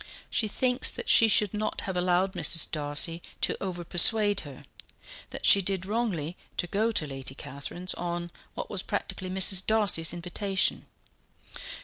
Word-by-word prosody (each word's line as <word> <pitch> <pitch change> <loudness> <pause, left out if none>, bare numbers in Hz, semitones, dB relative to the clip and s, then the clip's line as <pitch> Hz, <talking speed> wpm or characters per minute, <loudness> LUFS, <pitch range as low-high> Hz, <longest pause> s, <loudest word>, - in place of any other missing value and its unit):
She 220 - +1
thinks 250 +4 0
that - - -6
she 225 - +6
should 210 -1 +3
not 215 0 -3
have 190 - -5
allowed 180 +1 +1
Mrs. 165 -2 +3
Darcy 155 +2 +1 0.2
to - - 0
over 180 -2 -5
persuade 205 +4 +4
her 140 -4 -8 0.7
that - - -6
she 200 - +6
did 190 -1 -2
wrongly 195 -7 -2 0.2
to - - -1
go 210 +5 0
to 165 - +1
Lady 135 -2 -8
Catherine's 175 +8 -6
on 175 0 -5 0.2
what - - -5
was 195 - -3
practically 185 -1 -5
Mrs. 190 0 +3
Darcy's 205 -7 +2
invitation." 190 +3 -2
185 Hz, 150 wpm, -27 LUFS, 170-205 Hz, 0.7 s, she